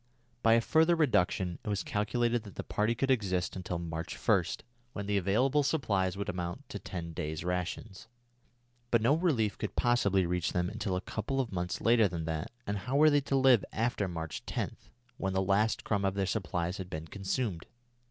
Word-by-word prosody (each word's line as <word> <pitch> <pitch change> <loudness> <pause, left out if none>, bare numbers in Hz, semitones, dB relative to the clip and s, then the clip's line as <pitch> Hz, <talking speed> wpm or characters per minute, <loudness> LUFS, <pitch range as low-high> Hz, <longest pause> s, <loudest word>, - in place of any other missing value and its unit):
By 115 - +5
a 115 - +5
further 160 +7 +4
reduction 95 - +1
it - - -4
was 100 -1 -1
calculated 120 +3 0
that 105 -2 -12
the - - -4
party 110 +3 0
could 135 +3 +1
exist 95 -7 0
until 90 -1 -3
March 85 0 -5
1, 100 -5 +3 0.5
when 100 - -4
the 105 0 0
available 120 +10 +2
supplies 100 - 0
would 100 - -3
amount 90 -1 -4
to - - -5
ten 85 -2 -6
days' 80 0 -4
rations. 90 +2 -3 0.8
But 115 -2 +3
no 125 +5 +5
relief 140 - +1
could - - -4
possibly 100 -6 +3
reach 90 0 -1
them 90 +1 0
until 100 -3 -2
a 90 - -1
couple 135 +8 -3
of 125 -4 -1
months 90 -1 -3
later 115 -2 +5
than 85 -3 -4
that, 80 -1 -3 0.2
and 100 0 -2
how 125 +8 -3
were 155 +2 +6
they 145 0 +4
to 135 0 -1
live 130 -5 +5
after 110 -3 0
March 80 -3 -5
10, - - -2 0.4
when 95 -1 -2
the 95 - +1
last 100 +3 +2
crumb 100 -2 0
of 95 0 +1
their 100 -1 +1
supplies 90 -3 -2
had 95 -2 -6
been 80 -3 -5
consumed? 100 0 -3
100 Hz, 195 wpm, -31 LUFS, 90-120 Hz, 0.8 s, were